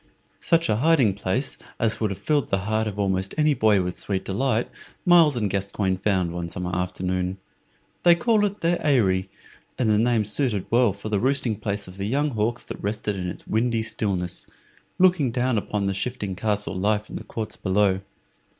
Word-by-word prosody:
Such 165 0 +2
a 105 - +1
hiding 135 -6 +4
place 100 +7 -1 0.2
as 110 -1 +1
would 110 - 0
have 100 - -4
filled 150 -2 0
the 95 -1 -1
heart 110 +1 0
of 105 -1 -5
almost 95 -1 -1
any 150 -1 +4
boy 105 -7 +3
with 90 0 -3
sweet 95 -2 -2
delight 120 +3 0 0.4
Myles 170 -5 +6
and 110 -4 0
Gascoyne 100 0 -1
found 95 -3 0
one 85 -1 -4
summer 90 0 -3
afternoon. 90 +1 -2 0.6
They 175 -1 +6
called 220 +2 +2
it 205 0 -2
their 170 +1 +1
Eyry, 100 -10 +2 0.5
and 115 -4 +2
the 105 - +3
name 115 -2 +2
suited 105 -2 0
well 120 -2 +4
for 100 +2 -7
the 105 -2 +1
roosting 130 -2 +1
place 100 -1 -4
of 90 +1 -11
the 100 +1 -3
young 145 +5 +1
hawks 115 +1 -1
that - - -8
rested 105 0 -2
in 90 -1 -3
its - - -8
windy 115 0 0
stillness, 95 -5 -2 0.5
looking 180 -7 +4
down 125 +1 0
upon 105 0 -3
the 100 - 0
shifting 100 -2 -3
castle 105 0 -1
life 105 +3 0
in - - -6
the - - -7
courts 110 -1 -5
below. 95 -1 +1
105 Hz, 190 wpm, -24 LUFS, 95-125 Hz, 0.6 s, Myles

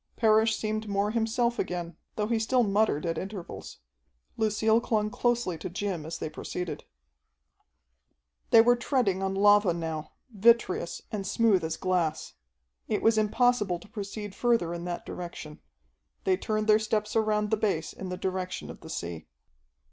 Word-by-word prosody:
Parrish 220 -1 +4
seemed 215 0 -3
more 200 +1 +1
himself 235 +1 0
again, 175 -2 -3 0.2
though 210 - 0
he 225 +1 0
still 245 +3 +2
muttered 205 -7 +1
at 165 -1 -1
intervals. 190 - -8 0.5
Lucille 220 +1 +2
clung 215 -2 0
closely 235 -9 0
to 180 - -5
Jim 180 -3 -3
as 165 - -5
they - - -4
proceeded. 175 +3 -5 1.6
They 225 - +8
were 245 +1 +5
treading 235 -6 0
on 195 0 -1
lava 205 -2 +5
now, 160 -2 -4 0.2
vitreous, 225 -4 +2
and 200 -2 -3
smooth 205 -3 +3
as 160 0 -2
glass. 175 - -1 0.5
It - - -1
was 220 -1 +4
impossible 215 -3 +2
to 170 - -15
proceed 205 -1 -6
further 230 -9 +1
in 170 0 -5
that 175 -1 -4
direction. 165 -4 -7 0.6
They 190 - +3
turned 215 +3 -2
their 215 0 +5
steps 215 -1 -1
around 215 -1 +1
the - - +4
base 200 -7 -1
in 190 - -7
the 180 - -4
direction 185 -1 -3
of - - -13
the 160 - -11
sea. 85 - -5
205 Hz, 155 wpm, -28 LUFS, 180-220 Hz, 1.6 s, They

